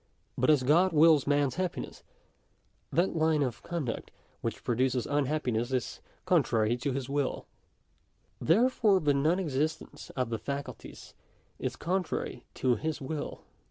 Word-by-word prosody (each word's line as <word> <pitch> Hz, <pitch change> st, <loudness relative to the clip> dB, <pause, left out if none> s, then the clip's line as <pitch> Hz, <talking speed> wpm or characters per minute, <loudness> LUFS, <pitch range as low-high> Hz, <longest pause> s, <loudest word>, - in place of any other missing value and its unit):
But 130 Hz, -, +1 dB
as 145 Hz, -4 st, +5 dB
God 165 Hz, +7 st, +4 dB
wills 155 Hz, -2 st, +5 dB
mans 145 Hz, -1 st, +2 dB
happiness, 185 Hz, -1 st, -3 dB, 0.9 s
that 175 Hz, +2 st, +1 dB
line 160 Hz, -2 st, +2 dB
of 120 Hz, -4 st, -3 dB
con 170 Hz, -4 st, -3 dB
duct 115 Hz, -, -4 dB, 0.3 s
which -, -, -4 dB
produces 125 Hz, +1 st, +1 dB
unhappiness 135 Hz, -5 st, 0 dB
is 130 Hz, -2 st, -2 dB, 0.2 s
contrary 110 Hz, 0 st, +2 dB
to 135 Hz, +3 st, -2 dB
his 130 Hz, -1 st, -3 dB
wilL 140 Hz, -1 st, -1 dB, 0.9 s
Therefore 215 Hz, +1 st, +3 dB
the 150 Hz, -4 st, +2 dB
non 155 Hz, +6 st, +2 dB
exercise 155 Hz, -2 st, -3 dB
of 125 Hz, -3 st, -1 dB
the 115 Hz, -, -2 dB
faculties 140 Hz, +4 st, -7 dB, 0.5 s
is -, -, -3 dB
contrary 180 Hz, +1 st, -2 dB
to 125 Hz, -3 st, +2 dB
his 155 Hz, +6 st, -3 dB
will. 145 Hz, +2 st, -5 dB
145 Hz, 135 wpm, -30 LUFS, 130-160 Hz, 0.9 s, as